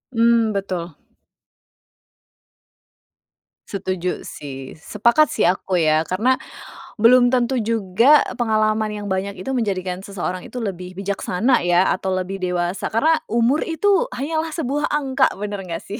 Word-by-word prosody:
Mmm, 230 -1 +3
betul. 180 -5 -4 2.7
Setuju 185 -2 -3
sih, 135 0 -9
sepakat 235 - +2
sih - - -1
aku 185 0 +1
ya, 155 -1 +2
karena 240 +8 +1 0.6
belum 245 +2 +5
tentu 250 0 +1
juga 230 +5 +3 0.2
pengalaman 215 -1 +1
yang 210 -1 -6
banyak 195 +2 -2
itu 265 - -4
menjadikan 190 -7 -2
seseorang 185 -2 -5
itu 245 -2 -6
lebih 185 -2 -6
bijaksana 200 +5 0
ya, 175 +2 +3
atau 190 -1 -1
lebih 185 +1 -4
dewasa, 180 0 -2
karena 315 +8 +2
umur 235 +6 +1
itu 375 +4 +2
hanyalah 315 +4 -2
sebuah 295 -1 -1
angka, 270 -2 +1
bener 205 -2 -5
nggak 165 -1 -5
sih? 205 - -7
210 Hz, 130 wpm, -21 LUFS, 185-250 Hz, 2.7 s, belum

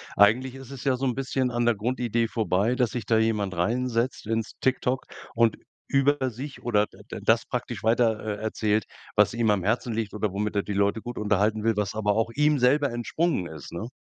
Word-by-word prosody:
eigentlich 125 +6 +4
ist 135 -1 -10
es 135 -3 -8
ja 135 -2 +3
so 130 +2 -2
'n 125 - +1
bisschen 130 0 -1
an 120 0 0
der 120 -1 +3
Grundidee 115 +1 0
vorbei, 110 +1 +1
dass 125 -4 +1
sich 120 -3 -4
da 110 - +3
jemand 105 -3 +1
reinsetzt 115 +6 -1
ins 115 0 -2
TikTok 130 0 +1 0.3
und 115 -1 +3 0.3
über 135 -1 +2
sich 130 +4 -8
oder 105 -3 +2
d - - -20
da - - -6
das - - +3
praktisch - - -4
weiter, 115 -1 +3 0.2
äh, - - -9
erzählt, 110 -1 0 0.3
was - - +4
ihm 115 -2 +2
am 100 -3 +1
Herzen 115 +4 0
liegt 110 -2 -3
oder 105 -1 -1
womit 105 +1 -2
er 100 - +1
die 105 - -4
Leute 100 +2 +1
gut 120 +2 -6
unterhalten 105 +1 +1
will, 115 -1 +1
was 100 -1 -1
aber 105 -2 0
auch 115 +1 0
ihm 150 +2 +3
selber 140 +3 +3
entsprungen 120 - -1
ist, 80 -3 -9
ne? 95 +7 -5
115 Hz, 215 wpm, -26 LUFS, 105-125 Hz, 0.3 s, eigentlich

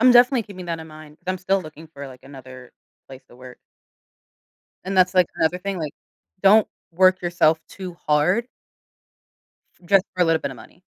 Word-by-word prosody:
I'm 255 +1 +6
definitely 245 0 +5
keeping 185 -3 -10
that 165 -1 -3
in 160 - -10
mind, 155 -1 -13
'cause - - -39
I'm 185 - -5
still 190 +1 0
looking 155 0 -12
for, 140 -2 -8
like, 130 -1 -13
another 130 -2 -12 0.4
place 135 0 -12
to 120 - -18
work. 125 0 -13 1.3
And 190 0 -2
that's, 185 +1 +4
like, 180 -2 +4
another 170 +3 +1
thing, 195 +1 -4
like, 155 -3 -4 0.5
don't 205 +2 +6 0.2
work 185 +2 +4
yourself 170 -2 +2
too 185 -3 -9
hard 180 +11 +2 1.4
just 195 +1 +4
for 180 - 0
a - - +1
little 165 -1 +2
bit - - -3
of - - -11
money. - - -16
175 Hz, 185 wpm, -22 LUFS, 150-190 Hz, 1.4 s, I'm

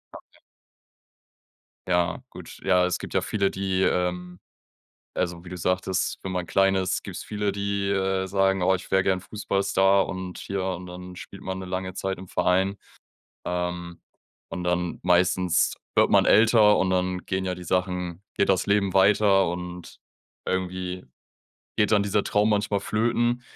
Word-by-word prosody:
Okay. - - -15 1.5
Ja, 90 +5 +1
gut. 90 - -11
Ja, 90 -1 +3
es 90 - -1
gibt - - -8
ja - - +2
viele, 100 -2 0
die, 95 -1 -1
ähm 90 0 -1 0.8
also 85 -1 -2
wie 90 - -10
du 90 - -6
sagtest, 90 +2 -1
wenn 95 - -4
man 90 -1 -2
klein 95 +1 +3
ist, 95 -1 -1
gibt's - - -6
viele, 105 -1 -2
die, 100 0 -2
äh, 95 -1 0
sagen: 95 0 +2
„Oh, 95 +1 +4
ich 95 0 -6
wäre 95 0 +3
gerne 95 -1 +1
Fußballstar 100 -1 +1
und 95 -1 -6
hier“ 95 -1 -3
und 90 -1 -4
dann 90 0 -9
spielt 95 +1 -10
man 95 0 -4
'ne 95 - -7
lange 95 0 -4
Zeit 95 0 -3
im 95 0 -10
Verein. 95 +3 +1 0.7
Ähm, 90 -1 -4 0.5
und 90 - -5
dann, 90 0 -1
meistens 90 0 +2 0.2
wird - - +4
man - - +5
älter 110 -1 +6
und 95 - +1
dann 90 0 0
gehen 95 0 -2
ja 90 -1 -2
die 90 - -9
Sachen, 90 -1 -2
geht 100 - +1
das 95 -2 +2
Leben 100 -2 +1
weiter 95 0 +4
und 90 0 -7 0.5
irgendwie 90 0 -3 0.7
geht 105 0 +2
dann 105 -1 +4
dieser 100 0 0
Traum 105 +1 +2
manchmal 105 -1 +1
flöten. 120 +3 0
95 Hz, 165 wpm, -25 LUFS, 90-100 Hz, 1.5 s, älter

